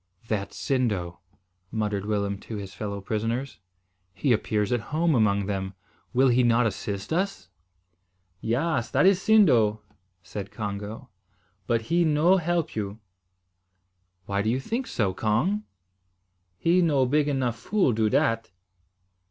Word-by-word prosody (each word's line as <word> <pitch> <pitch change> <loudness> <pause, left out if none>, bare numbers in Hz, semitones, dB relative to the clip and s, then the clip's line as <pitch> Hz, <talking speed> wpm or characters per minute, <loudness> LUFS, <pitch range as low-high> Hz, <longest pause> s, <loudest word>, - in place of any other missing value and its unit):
"That's 100 -3 -3
Sindo," 100 -10 -1 0.5
muttered 105 -2 -2
Willem 100 -2 -1
to 110 - -8
his 100 -2 -7
fellow 100 -1 -5
prisoners. 115 +6 -3 0.6
"He 135 -4 +2
appears 105 -2 0
at 120 - +2
home 165 +1 +2
among 100 -5 +2
them. 95 -1 -3 0.4
Will 130 +1 +4
he 125 +1 +4
not 120 0 +3
assist 100 +3 -3
us?" 180 - -2 0.9
"Yaas, 120 +2 0
that - - +4
is 195 0 +5
Sindo," 120 - +4 0.4
said 100 +1 -6
Congo, 105 +4 -6 0.6
"but 115 -1 +1
he 170 +8 +2
no 160 +4 +4
help 170 -2 -1
you." 105 0 -4 1.3
"Why 100 0 -1
do 110 - 0
you 125 +3 +1
think 235 - -3
so, 100 -5 0
Cong?" 120 - 0 0.9
"He 170 - +3
no 145 -6 +3
big 145 +3 +2
enough 130 -5 0
fool 200 - +1
do 110 0 +1
dat." 115 0 +1
115 Hz, 135 wpm, -26 LUFS, 105-150 Hz, 1.3 s, is